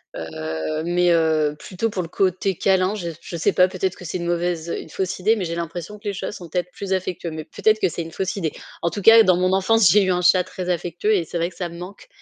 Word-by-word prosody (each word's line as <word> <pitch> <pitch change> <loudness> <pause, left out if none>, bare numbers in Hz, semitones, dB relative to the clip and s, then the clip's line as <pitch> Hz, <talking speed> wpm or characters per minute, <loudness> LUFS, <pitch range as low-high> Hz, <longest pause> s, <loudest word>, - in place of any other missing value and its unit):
heu. 80 - -4
Mais, 175 +1 +2
heu, 155 -2 +2
plutôt 190 +8 -3
pour 190 -4 -3
le - - -7
côté 190 +1 0
câlin, 190 +2 +2
je 175 -5 -4
je 170 - -7
sais 200 - +2
pas, 180 - +5
peut-être 185 0 -2
que 180 - -11
c'est 175 - -3
une 170 -1 -4
mauvaise 175 -1 -1
une - - -10
fausse 190 +3 -3
idée, 215 +5 +3
mais 200 -5 -3
j'ai 170 0 -3
l'impression 170 +4 -5
que 205 - -10
les 200 - -1
chats 185 - -4
sont 175 -5 -10
peut-être 180 +1 -2
plus 195 0 -4
affectueux, 185 -2 -3
mais 155 -1 -6
peut-être 215 +5 +1
que - - +3
c'est 170 - -4
une 165 - -9
fausse 190 +2 -3
idée. 165 -6 -2 0.3
En 170 - +1
tout 205 - -4
cas, 225 +3 +8
dans 185 -3 +4
mon 185 +1 +1
enfance, 200 +1 +4
j'ai 205 +4 +5
eu 185 - +1
un 180 - +1
chat 180 +1 +5
très 185 0 -6
affectueux 175 +4 0
et 175 -4 0
c'est 170 - -5
vrai 170 +1 0
que - - -20
ça 175 -2 -3
me 170 - -10
manque. 185 +3 -10
180 Hz, 275 wpm, -22 LUFS, 170-190 Hz, 0.3 s, cas